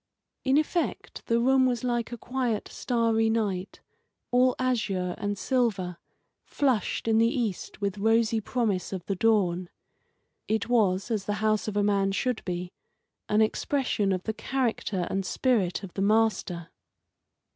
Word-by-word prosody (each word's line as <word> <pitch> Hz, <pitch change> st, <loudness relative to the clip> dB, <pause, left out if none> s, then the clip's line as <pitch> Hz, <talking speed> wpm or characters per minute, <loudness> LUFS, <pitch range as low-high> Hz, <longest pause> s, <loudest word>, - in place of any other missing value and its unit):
In 270 Hz, +1 st, +3 dB
effect 320 Hz, +3 st, -2 dB
the 230 Hz, 0 st, +2 dB
room 260 Hz, +2 st, +4 dB
was 245 Hz, -2 st, -1 dB
like 240 Hz, -2 st, -1 dB
a 240 Hz, -, -5 dB
quiet, 245 Hz, -3 st, -2 dB
starry 230 Hz, -2 st, +1 dB
night, 205 Hz, -4 st, -2 dB, 0.5 s
all 250 Hz, +1 st, +4 dB
azure 210 Hz, -8 st, 0 dB
and 205 Hz, 0 st, -2 dB
silver, 200 Hz, -9 st, 0 dB, 0.5 s
flushed 255 Hz, -7 st, 0 dB
in 225 Hz, 0 st, +4 dB
the 230 Hz, +1 st, +4 dB
cast 220 Hz, -5 st, -3 dB
with 200 Hz, 0 st, -2 dB
rosy 225 Hz, +1 st, +3 dB
promise 215 Hz, -5 st, -1 dB
of 190 Hz, -3 st, -5 dB
the 195 Hz, -, -1 dB
dawn. 185 Hz, -4 st, +2 dB, 0.8 s
It 220 Hz, 0 st, 0 dB
was, 210 Hz, -3 st, +2 dB
as 210 Hz, -3 st, -1 dB
the 205 Hz, -, -1 dB
house 215 Hz, 0 st, 0 dB
of 210 Hz, -1 st, -2 dB
a 205 Hz, -, +3 dB
man 200 Hz, -1 st, +2 dB
should 250 Hz, +3 st, -1 dB
be, 180 Hz, 0 st, -4 dB, 0.6 s
an 210 Hz, +1 st, +3 dB
expression 220 Hz, -3 st, 0 dB
of 185 Hz, -1 st, -1 dB
the 220 Hz, -, -2 dB
character 225 Hz, -7 st, -1 dB
and 195 Hz, 0 st, 0 dB
spirit 210 Hz, -4 st, 0 dB
of 185 Hz, -, -8 dB
the 195 Hz, -, -3 dB
master. 205 Hz, -5 st, +1 dB
220 Hz, 150 wpm, -27 LUFS, 195-240 Hz, 0.8 s, room